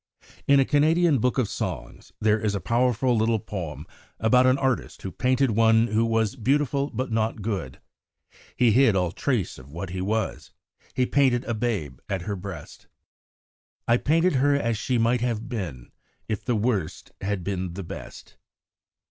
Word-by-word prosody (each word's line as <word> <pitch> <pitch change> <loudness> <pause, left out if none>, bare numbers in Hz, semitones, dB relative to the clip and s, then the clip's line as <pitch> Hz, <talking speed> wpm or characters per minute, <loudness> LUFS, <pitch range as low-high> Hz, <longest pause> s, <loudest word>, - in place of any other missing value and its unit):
In 140 0 +6
a 135 - +4
Canadian 155 +1 +3
book 125 +4 0
of 130 -5 +2
songs - - -6
there 110 0 +2
is 105 -1 -1
a - - -1
powerful 125 +2 +1
little 110 +1 +2
poem 85 -9 -6 0.3
about 125 +3 +4
an 130 +1 +4
artist 130 -3 -2
who 95 - -4
painted 130 +2 +1
one 115 +1 +4
who 110 +1 +2
was 115 0 +1
beautiful 140 +2 +1
but 130 -3 -4
not 110 -1 -1
good. 95 - -4 0.8
He 120 -2 +4
hid 115 -2 +4
all 90 -3 +1
trace 115 - -2
of 65 +2 -14
what 85 +3 -6
was; 100 +3 -2 0.4
he 130 - +2
painted 130 -3 +2
a 120 - -2
babe 105 - -2
at 95 -3 -2
her 100 +1 -3
breast. 90 -5 -9 1.0
I 120 - +4
painted 165 +3 +2
her 140 +2 +3
as 115 -5 0
she 125 +3 -1
might 115 +1 +2
have 120 -1 -2
been 90 - -6 0.4
If 105 -2 -3
the 120 - +1
Worst 105 -7 -2
had 100 -2 -2
been 90 -2 -3
the 100 - -5
Best. 85 - -10
115 Hz, 165 wpm, -25 LUFS, 100-130 Hz, 1.0 s, In